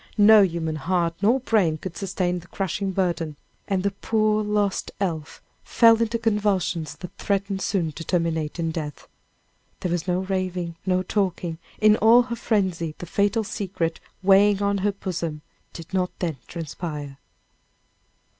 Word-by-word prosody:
No 215 Hz, +1 st, +8 dB
human 165 Hz, -4 st, 0 dB
heart 170 Hz, +2 st, 0 dB
nor 235 Hz, +6 st, +3 dB
brain 195 Hz, -10 st, +2 dB
could 170 Hz, +1 st, -7 dB
sustain 180 Hz, -2 st, -1 dB
the 175 Hz, -, -15 dB
crushing 195 Hz, +2 st, -2 dB
burden, 175 Hz, -5 st, -1 dB, 0.3 s
and 190 Hz, -2 st, 0 dB
the 200 Hz, -, +1 dB
poor 215 Hz, +1 st, +1 dB
lost 210 Hz, -2 st, 0 dB
elf 165 Hz, -7 st, -3 dB, 0.2 s
fell 230 Hz, -1 st, +5 dB
into 230 Hz, 0 st, +1 dB
convulsions 200 Hz, -8 st, 0 dB
that 180 Hz, -, -10 dB
threatened 200 Hz, -1 st, -1 dB
soon 175 Hz, -6 st, 0 dB
to 165 Hz, -, -8 dB
terminate 165 Hz, -3 st, -1 dB
in 165 Hz, -1 st, -1 dB
death. 150 Hz, -3 st, -6 dB, 0.7 s
There 180 Hz, -, -1 dB
was 175 Hz, 0 st, -2 dB
no 180 Hz, 0 st, +1 dB
raving, 185 Hz, -3 st, -2 dB
no 185 Hz, 0 st, +2 dB
talking; 180 Hz, -4 st, -1 dB, 0.2 s
in 215 Hz, 0 st, +5 dB
all 230 Hz, +3 st, +6 dB
her 240 Hz, -1 st, -4 dB
frenzy, 185 Hz, -9 st, -1 dB
the -, -, -7 dB
fatal 205 Hz, +5 st, +1 dB
secret 185 Hz, -5 st, -3 dB, 0.2 s
weighing 200 Hz, +1 st, +5 dB
on 200 Hz, 0 st, +1 dB
her 205 Hz, +2 st, +1 dB
bosom 170 Hz, -6 st, -4 dB, 0.3 s
did 165 Hz, 0 st, -11 dB
not 180 Hz, -1 st, +1 dB
then 165 Hz, -6 st, -2 dB
transpire. 150 Hz, -4 st, -6 dB
185 Hz, 150 wpm, -24 LUFS, 165-205 Hz, 0.7 s, No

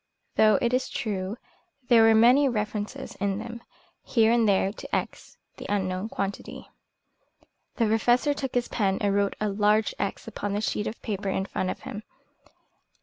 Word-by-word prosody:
Though, 215 Hz, -2 st, +5 dB
it 235 Hz, +1 st, +1 dB
is 255 Hz, +1 st, 0 dB
true, 200 Hz, -1 st, -3 dB, 0.5 s
there 235 Hz, -2 st, +6 dB
were 225 Hz, 0 st, +6 dB
many 250 Hz, +5 st, +5 dB
references 215 Hz, +3 st, -4 dB
in 195 Hz, 0 st, 0 dB
them, 235 Hz, +2 st, -7 dB, 0.4 s
here 225 Hz, -2 st, +2 dB
and 230 Hz, -2 st, +3 dB
there, 195 Hz, 0 st, +2 dB
to -, -, -5 dB
X, -, -, -5 dB, 0.2 s
the -, -, -8 dB
unknown 190 Hz, 0 st, -1 dB
quantity. 200 Hz, -2 st, -5 dB, 1.1 s
The 230 Hz, -, +2 dB
Professor 240 Hz, +6 st, +2 dB
took 270 Hz, -3 st, -5 dB
his 245 Hz, -1 st, +1 dB
pen 195 Hz, -4 st, 0 dB
and 200 Hz, -1 st, +1 dB
wrote 200 Hz, 0 st, +1 dB
a 215 Hz, -, 0 dB
large 210 Hz, +2 st, +2 dB
X 200 Hz, -, -3 dB
upon 205 Hz, 0 st, -4 dB
the 205 Hz, -, -1 dB
sheet 210 Hz, -1 st, -1 dB
of 220 Hz, -, -6 dB
paper 200 Hz, -3 st, -3 dB
in 190 Hz, 0 st, -1 dB
front 185 Hz, -1 st, -3 dB
of -, -, -5 dB
him. 210 Hz, -, -7 dB
215 Hz, 170 wpm, -26 LUFS, 200-235 Hz, 1.1 s, there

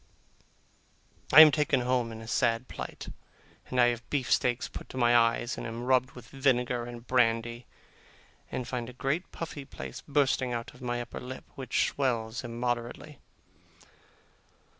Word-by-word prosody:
I 155 Hz, -, +11 dB
am 155 Hz, -1 st, +10 dB
taken 145 Hz, -3 st, +2 dB
home 125 Hz, -2 st, 0 dB
in 110 Hz, 0 st, -8 dB
a 115 Hz, -, -10 dB
sad 115 Hz, +1 st, +1 dB
plight, -, -, -7 dB, 0.6 s
and 130 Hz, -, -1 dB
I 120 Hz, 0 st, +6 dB
have 120 Hz, 0 st, -5 dB
beef 135 Hz, -4 st, -1 dB
steaks 125 Hz, 0 st, +2 dB
put -, -, -9 dB
to -, -, -8 dB
my 120 Hz, -1 st, +4 dB
eyes, 115 Hz, +1 st, +2 dB
and -, -, -5 dB
am 115 Hz, +1 st, -5 dB
rubbed 130 Hz, 0 st, +2 dB
with 120 Hz, -2 st, -12 dB
vinegar 125 Hz, -3 st, +1 dB
and 120 Hz, 0 st, -9 dB
brandy, 120 Hz, -1 st, +1 dB, 0.8 s
and 125 Hz, -, -3 dB
find 120 Hz, -2 st, -4 dB
a -, -, -10 dB
great 140 Hz, +8 st, -2 dB
puffy 150 Hz, -4 st, -6 dB
place -, -, -8 dB
bursting 135 Hz, -3 st, +1 dB
out 115 Hz, -1 st, -5 dB
on 125 Hz, -, -14 dB
my 120 Hz, 0 st, -1 dB
upper -, -, -8 dB
lip, 130 Hz, +1 st, -8 dB
which 130 Hz, -2 st, 0 dB
swells 120 Hz, -3 st, -1 dB
immoderately. 120 Hz, +4 st, -4 dB
125 Hz, 160 wpm, -29 LUFS, 120-130 Hz, 0.8 s, I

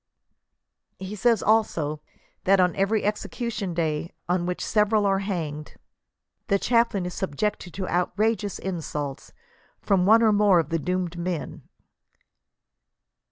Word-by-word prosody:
He 190 Hz, +2 st, -6 dB
says 230 Hz, 0 st, +2 dB
also, 165 Hz, -9 st, +1 dB, 0.4 s
that 195 Hz, +1 st, +5 dB
"on 180 Hz, -1 st, +3 dB
every 200 Hz, +3 st, +1 dB
execution 210 Hz, -1 st, -3 dB
day 160 Hz, 0 st, -1 dB, 0.2 s
on 175 Hz, 0 st, 0 dB
which 180 Hz, -, -3 dB
several 210 Hz, -1 st, +2 dB
are 195 Hz, -1 st, +2 dB
banged, 160 Hz, -7 st, -4 dB, 0.7 s
the 200 Hz, -, +3 dB
chaplain 230 Hz, -4 st, +1 dB
is 180 Hz, -, -4 dB
subjected 190 Hz, +1 st, -2 dB
to 190 Hz, -2 st, -3 dB
outrageous 205 Hz, +4 st, 0 dB
insults 150 Hz, -6 st, -5 dB, 0.5 s
from 190 Hz, -3 st, +2 dB
one 225 Hz, +2 st, +6 dB
or 220 Hz, -2 st, +5 dB
more 205 Hz, -3 st, +5 dB
of 160 Hz, -, -1 dB
the 165 Hz, 0 st, 0 dB
doomed 180 Hz, +1 st, -2 dB
men." 170 Hz, -4 st, -5 dB
190 Hz, 125 wpm, -25 LUFS, 170-210 Hz, 0.7 s, one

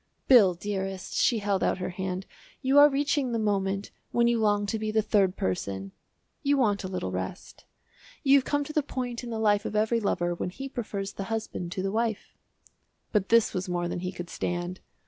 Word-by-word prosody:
"Bill, 205 Hz, -9 st, +7 dB
dearest," 190 Hz, 0 st, -4 dB
she 235 Hz, -, +3 dB
held 200 Hz, -2 st, 0 dB
out -, -, +1 dB
her 185 Hz, 0 st, -3 dB
hand, 185 Hz, +1 st, -4 dB, 0.4 s
"you 270 Hz, +2 st, +5 dB
are 290 Hz, +1 st, +9 dB
reaching 280 Hz, -2 st, 0 dB
the -, -, +1 dB
moment 200 Hz, -2 st, -1 dB, 0.2 s
when 235 Hz, 0 st, +3 dB
you 235 Hz, -1 st, +2 dB
long 205 Hz, -1 st, +2 dB
to 220 Hz, +2 st, -2 dB
be 215 Hz, 0 st, -2 dB
the 215 Hz, 0 st, +2 dB
third 200 Hz, -3 st, +2 dB
person. 95 Hz, +1 st, -2 dB, 0.5 s
You 285 Hz, 0 st, +2 dB
want 205 Hz, -6 st, +2 dB
a -, -, -3 dB
little 180 Hz, -, -3 dB
rest. 95 Hz, 0 st, -6 dB, 0.6 s
You 275 Hz, 0 st, +6 dB
have -, -, -5 dB
come 290 Hz, +2 st, 0 dB
to 305 Hz, -, -8 dB
the 305 Hz, -, +3 dB
point 250 Hz, -3 st, -4 dB
in 240 Hz, -, -6 dB
the 225 Hz, -, -3 dB
life 210 Hz, -2 st, +3 dB
of 215 Hz, -, -4 dB
every 220 Hz, +2 st, +2 dB
lover 175 Hz, -4 st, 0 dB
when 175 Hz, -, -3 dB
he 270 Hz, +9 st, -7 dB
prefers 205 Hz, -6 st, -4 dB
the 195 Hz, -, -5 dB
husband 215 Hz, -5 st, -4 dB
to 185 Hz, -, -3 dB
the 195 Hz, -, -1 dB
wife." 225 Hz, -1 st, -2 dB, 0.8 s
But 200 Hz, -3 st, +1 dB
this 230 Hz, -1 st, +4 dB
was 185 Hz, +1 st, -3 dB
more 175 Hz, -1 st, -1 dB
than 175 Hz, -, -3 dB
he 180 Hz, +1 st, -3 dB
could 175 Hz, -1 st, -8 dB
stand. 175 Hz, +1 st, -3 dB
205 Hz, 210 wpm, -28 LUFS, 185-235 Hz, 0.8 s, are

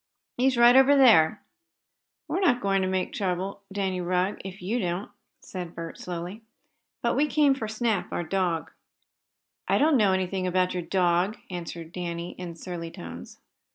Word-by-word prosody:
He's 255 Hz, 0 st, +2 dB
right 240 Hz, +1 st, +7 dB
over 270 Hz, +2 st, +7 dB
there." 215 Hz, -, +5 dB, 0.8 s
"We're -, -, -1 dB
not 340 Hz, -11 st, +3 dB
going 195 Hz, -3 st, +1 dB
to 185 Hz, -, 0 dB
make 185 Hz, -1 st, -1 dB
any -, -, -8 dB
trouble, 190 Hz, +1 st, -2 dB
Danny 190 Hz, -2 st, -1 dB
Rugg, 180 Hz, +3 st, 0 dB
if 190 Hz, +1 st, -8 dB
you 210 Hz, +7 st, -2 dB
don't," 180 Hz, +1 st, -3 dB, 0.3 s
said 180 Hz, -3 st, -7 dB
Bert 165 Hz, 0 st, -7 dB
slowly, 180 Hz, +4 st, -6 dB, 0.6 s
"But 235 Hz, -, +1 dB
we 290 Hz, +3 st, +3 dB
came 295 Hz, -2 st, +4 dB
for 230 Hz, -5 st, -4 dB
Snap, 220 Hz, -1 st, -1 dB
our -, -, -2 dB
dog." 175 Hz, -1 st, -1 dB, 1.0 s
"I -, -, +3 dB
don't 300 Hz, 0 st, +4 dB
know 205 Hz, -4 st, +4 dB
anything 190 Hz, 0 st, -1 dB
about 180 Hz, 0 st, +1 dB
your 180 Hz, -, -2 dB
dog," 180 Hz, +3 st, +1 dB
answered 170 Hz, -2 st, -6 dB
Danny, 170 Hz, -1 st, -4 dB
in 175 Hz, -2 st, -6 dB
surly 170 Hz, -1 st, -6 dB
tones. 85 Hz, -, -10 dB
185 Hz, 165 wpm, -26 LUFS, 175-220 Hz, 1.0 s, right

